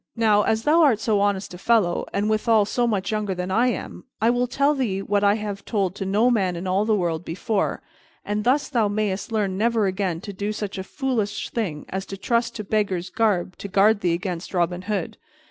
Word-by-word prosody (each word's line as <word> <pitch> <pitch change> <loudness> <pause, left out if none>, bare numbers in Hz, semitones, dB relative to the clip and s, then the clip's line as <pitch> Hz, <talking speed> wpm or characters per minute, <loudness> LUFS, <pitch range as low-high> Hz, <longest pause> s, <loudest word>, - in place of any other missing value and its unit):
"Now, 215 -3 +4
as 220 +1 0
thou 320 +5 +4
art 265 -9 +4
so 220 -2 +1
honest 200 -1 0
a 180 - -9
fellow, 210 -6 +2
and, 200 +1 0
withal, 215 0 +3
so 240 +3 0
much 200 -3 -1
younger 210 -3 -1
than 180 +1 -4
I 235 +6 +3
am, 245 - -4 0.2
I 225 +2 +3
will 245 +1 +1
tell 280 +4 +2
thee 235 -9 -1
that - - -10
which 205 -1 +3
I 205 0 +4
have 205 -2 -5
told 195 -5 -1
to 195 -1 -5
no 215 +6 +3
man 190 -6 +1
in 170 +2 -5
all 190 +3 +1
the 220 -1 +2
world 170 -4 -1
before, 195 +5 -2 0.4
and 210 +1 -1
thus 265 +5 +2
thou 235 -6 +1
mayst 205 0 -2
learn 200 -4 -1
never 225 -1 +2
again 190 -3 -1
to 200 - -7
do 205 +3 -3
such 205 -2 -5
a - - -3
foolish 225 -2 -2
thing 180 -11 -3
as 190 0 -4
to 195 - -6
trust 235 +3 0
to 215 - -4
beggar's 195 -4 -1
garb 200 -6 +1
to - - -5
guard 200 +2 +4
thee 175 -2 +1
against 180 +1 -4
Robin 175 0 0
Hood. 195 -3 -3
205 Hz, 225 wpm, -23 LUFS, 190-225 Hz, 0.4 s, Now